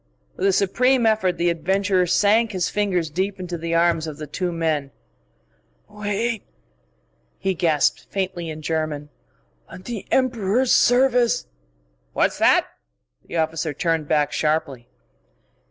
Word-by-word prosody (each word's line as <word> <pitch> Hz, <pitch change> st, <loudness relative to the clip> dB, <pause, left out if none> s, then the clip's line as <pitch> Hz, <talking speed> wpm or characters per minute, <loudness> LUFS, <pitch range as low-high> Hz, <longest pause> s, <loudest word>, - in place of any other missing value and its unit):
With 190 Hz, -, 0 dB
a -, -, +4 dB
supreme 240 Hz, +6 st, +2 dB
effort 215 Hz, -5 st, +2 dB
the 175 Hz, 0 st, +2 dB
adventurer 185 Hz, +2 st, +1 dB
sank 215 Hz, +5 st, +3 dB
his 185 Hz, -2 st, -1 dB
fingers 190 Hz, -5 st, 0 dB
deep 190 Hz, +4 st, -2 dB
into 180 Hz, -1 st, -5 dB
the 165 Hz, 0 st, -3 dB
arms 165 Hz, -1 st, +2 dB
of 150 Hz, -2 st, -7 dB
the 155 Hz, -, -6 dB
two 175 Hz, +5 st, -3 dB
men. 160 Hz, -4 st, -1 dB, 1.0 s
"Wait!" 210 Hz, +2 st, -2 dB, 1.0 s
he 190 Hz, 0 st, -1 dB
gasped 165 Hz, -4 st, +1 dB
faintly 185 Hz, -4 st, -3 dB
in 155 Hz, 0 st, -7 dB
German. 155 Hz, -2 st, -2 dB, 0.6 s
"On 185 Hz, -, -11 dB
the 225 Hz, -1 st, -6 dB
Emperor's 245 Hz, -1 st, +1 dB
service 245 Hz, -, +3 dB, 0.3 s
" -, -, -42 dB
"What's -, -, +1 dB
that?" -, -, +4 dB, 0.6 s
The -, -, -4 dB
officer 160 Hz, -1 st, -1 dB
turned 165 Hz, -1 st, -1 dB
back 150 Hz, -1 st, +1 dB
sharply. 145 Hz, -6 st, -1 dB
180 Hz, 135 wpm, -22 LUFS, 160-205 Hz, 1.0 s, a